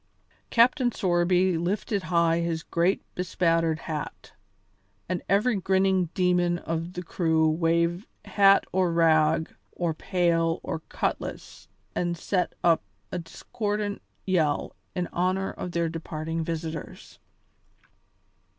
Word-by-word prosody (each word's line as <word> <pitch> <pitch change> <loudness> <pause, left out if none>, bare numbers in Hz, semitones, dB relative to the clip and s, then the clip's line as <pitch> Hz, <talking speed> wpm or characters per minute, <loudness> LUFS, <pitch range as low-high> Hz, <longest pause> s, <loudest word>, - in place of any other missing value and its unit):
Captain 245 +2 +4
Sorby 180 -2 +2
lifted 195 +3 -1
high 170 -1 +2
his 165 -1 -2
great 175 +3 +1
bespattered 165 -3 +1
hat, 150 -2 -6 0.7
and 180 -1 -2
every 210 +4 +3
grinning 190 -1 +2
demon 180 -1 +2
of 165 +1 -4
the 180 - -5
crew 160 -2 +1
waved 170 +4 +1 0.2
hat 195 -1 +5
or 185 -2 +2
rag 160 -1 +3 0.2
or 170 -2 -1
pail 165 -1 +1
or 165 - -3
cutlass - - -4 0.3
and 175 -1 -1
set 180 +2 -1
up 170 -2 +4 0.3
a 180 - -2
discordant 205 +3 -4 0.2
yell 160 -6 0 0.2
in 180 -1 0
honour 185 +2 0
of 180 - -6
their 170 -1 0
departing 160 0 -4
visitors. 160 -1 -6
175 Hz, 115 wpm, -26 LUFS, 165-185 Hz, 0.7 s, hat